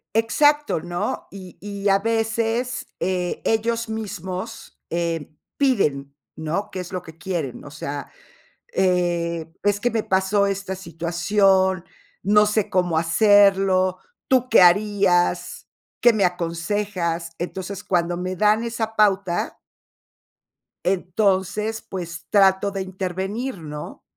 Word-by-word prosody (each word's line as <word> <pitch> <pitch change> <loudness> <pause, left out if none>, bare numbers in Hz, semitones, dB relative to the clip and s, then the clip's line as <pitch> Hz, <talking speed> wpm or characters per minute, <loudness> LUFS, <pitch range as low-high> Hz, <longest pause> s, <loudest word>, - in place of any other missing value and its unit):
Exacto, 290 - +3
¿no? 175 0 -3
Y 185 -2 -11
y 200 0 -3
a 195 0 +4
veces, 225 +2 -1
eh, 180 -1 -1
ellos 230 +1 0
mismos, 200 -1 -6
eh, 165 -2 -2 0.3
piden, 145 - +1 0.2
¿no? 160 +6 -3
Qué 185 - -5
es 180 0 -6
lo 185 -2 -3
que 160 -2 -13
quieren, 165 -7 -4
o 145 - -10
sea, 145 -1 -6 0.6
eh, 175 -3 +1 0.2
es 205 0 +2
que 245 +2 0
me 225 -2 0
pasó 190 +2 +2
esta 195 -1 -3
situación, 185 +2 +1 0.4
no 210 +2 +5
sé 210 -1 0
cómo 180 -3 +1
hacerlo, 190 +1 +4 0.3
¿tú 255 -1 +2
qué 225 - +6
harías? 190 -1 +3 0.3
¿Qué 240 - +7
me 200 -3 +2
aconsejas? 170 0 -2
Entonces, 185 +2 -5
cuando 175 -1 0
me 185 +1 -3
dan 215 +4 +3
esa 225 -1 -3
pauta 195 -4 +1 1.2
entonces, 195 +3 0
pues, 170 -3 -7
trato 195 0 +4
de 195 -1 -3
intervenir, 190 +5 -4
¿no? 150 -1 -8
190 Hz, 120 wpm, -23 LUFS, 175-210 Hz, 1.2 s, Qué